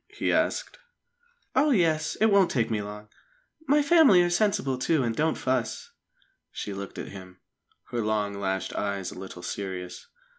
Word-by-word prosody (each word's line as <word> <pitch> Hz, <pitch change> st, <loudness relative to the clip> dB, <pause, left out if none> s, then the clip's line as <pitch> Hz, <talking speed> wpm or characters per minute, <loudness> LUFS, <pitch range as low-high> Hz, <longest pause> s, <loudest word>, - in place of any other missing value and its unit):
he -, -, -1 dB
asked. -, -, 0 dB, 0.8 s
"Oh, 285 Hz, +4 st, +4 dB
yes! 165 Hz, -, +2 dB
It 220 Hz, 0 st, +3 dB
won't 195 Hz, -3 st, +5 dB
take 115 Hz, -6 st, 0 dB
me 110 Hz, -2 st, 0 dB
long. 105 Hz, +1 st, -8 dB, 0.6 s
My 290 Hz, +2 st, +4 dB
family 285 Hz, -, +6 dB
are 175 Hz, -, 0 dB
sensible, 175 Hz, -9 st, +1 dB
too, 150 Hz, +1 st, +1 dB
and 115 Hz, -2 st, -1 dB
don't 155 Hz, +4 st, +1 dB
fuss." 130 Hz, -3 st, -2 dB, 0.6 s
She 105 Hz, -, -5 dB
looked 100 Hz, 0 st, -7 dB
at -, -, -6 dB
him, 95 Hz, -2 st, -11 dB, 0.5 s
her 120 Hz, -, -1 dB
long 105 Hz, -1 st, -1 dB
lashed 95 Hz, -1 st, -3 dB
eyes 100 Hz, -2 st, -3 dB
a -, -, -9 dB
little 95 Hz, -2 st, -9 dB
serious. 90 Hz, -2 st, -6 dB
120 Hz, 160 wpm, -27 LUFS, -, 0.8 s, family